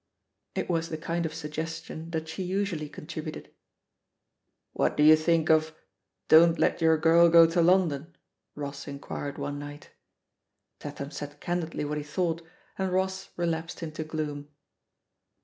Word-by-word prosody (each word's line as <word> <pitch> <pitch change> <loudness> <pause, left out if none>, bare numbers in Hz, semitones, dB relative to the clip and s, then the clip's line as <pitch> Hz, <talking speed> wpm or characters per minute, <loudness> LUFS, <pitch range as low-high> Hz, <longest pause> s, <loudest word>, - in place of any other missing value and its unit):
" - - -53
It - - -2
was 165 -2 -1
the 160 - -4
kind 165 +1 -2
of 155 - -9
suggestion 160 +1 -6
that 160 -1 -3
she 160 +4 -5
usually 185 -5 -2
con - - -10
tributed. 155 -1 -7 1.2
"What - - 0
do 150 - +4
you 155 +1 +9
think 160 0 +2
of 155 0 +2 0.5
'Don't 165 +1 +7
Let - - +1
Your 160 -1 +5
Girl 165 +2 +5
Go 165 0 +8
to 165 +1 +2
London'?" 170 -3 +2 0.4
Ross 140 -1 -6
inquired 140 0 -6
one 145 0 -4
night. 145 0 -9 0.9
Tatham 145 -1 -7
said 145 -1 -7
candidly 170 -3 -2
what 150 +1 -2
he - - -5
thought, 165 +2 -1 0.4
and 190 -1 0
Ross 190 +1 -1
relapsed 170 0 -2
into 155 0 -4
gloom. 150 -2 -4
160 Hz, 150 wpm, -28 LUFS, 150-170 Hz, 1.2 s, you